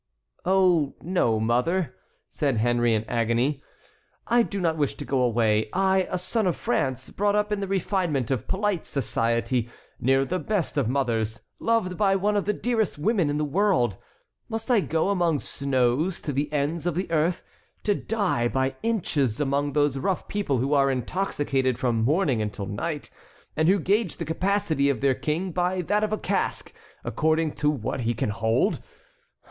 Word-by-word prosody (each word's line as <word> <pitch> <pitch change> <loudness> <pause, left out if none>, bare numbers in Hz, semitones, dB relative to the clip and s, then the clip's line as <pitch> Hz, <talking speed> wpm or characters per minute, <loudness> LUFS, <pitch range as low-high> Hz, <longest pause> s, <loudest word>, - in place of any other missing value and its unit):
"Oh, 180 -6 +3
no, 160 -11 +1
mother," 125 +8 +1 0.3
said 140 -5 -1
Henry 120 0 +2
in 110 - 0
agony, 120 +5 0 0.6
"I 240 +1 +4
do 200 -3 -2
not 165 -3 +1
wish 145 -3 -1
to - - -7
go 135 -2 0
away. 110 -3 +2
I, 190 -1 +2
a - - -1
son 210 +3 0
of 175 - +1
France, 130 -2 -1
brought 205 +1 +1
up 210 0 +1
in 210 - 0
the 195 - -3
refinement 180 - 0
of 130 -5 -1
polite 200 -3 -1
society, 115 -1 0 0.3
near 135 +2 +3
the 180 +6 -2
best 205 -5 -1
of 135 -6 +1
mothers, 115 -5 -1 0.2
loved 225 -6 0
by 195 -2 +3
one 205 +2 +1
of 205 - +1
the 210 - +2
dearest 225 -6 -1
women 185 -1 +1
in 145 - -1
the 150 - 0
world, 150 - +2 0.5
must 225 +2 -3
I 235 - +5
go 165 -1 0
among 175 -6 +1
snows, 140 +7 0
to 145 - -3
the 145 +2 -1
ends 150 +3 -1
of 175 - -1
the 180 -1 -3
earth, 165 +2 +1 0.4
to 205 - +2
die 200 - 0
by 130 +1 -1
inches 160 - 0
among 145 0 0
those 145 -2 +2
rough 185 +5 -1
people 200 -10 -1
who 135 +4 0
are 140 -1 +4
intoxicated 135 -2 -1
from 120 -3 0
morning 145 - +2
until 105 -1 -4
night, 145 - -4 0.4
and 155 +1 +2
who 195 - +5
gauge 195 +1 0
the 165 - -4
capacity 160 -4 +1
of 135 -5 0
their 135 +1 +3
king 165 +7 -2
by 180 +1 0
that 210 +5 +1
of 215 - 0
a 215 - 0
cask, - - -2 0.3
according 160 0 +1
to 150 - 0
what 135 -4 -2
he 120 -1 -1
can 105 - -1
hold? 110 +1 +1
150 Hz, 175 wpm, -25 LUFS, 130-190 Hz, 0.6 s, I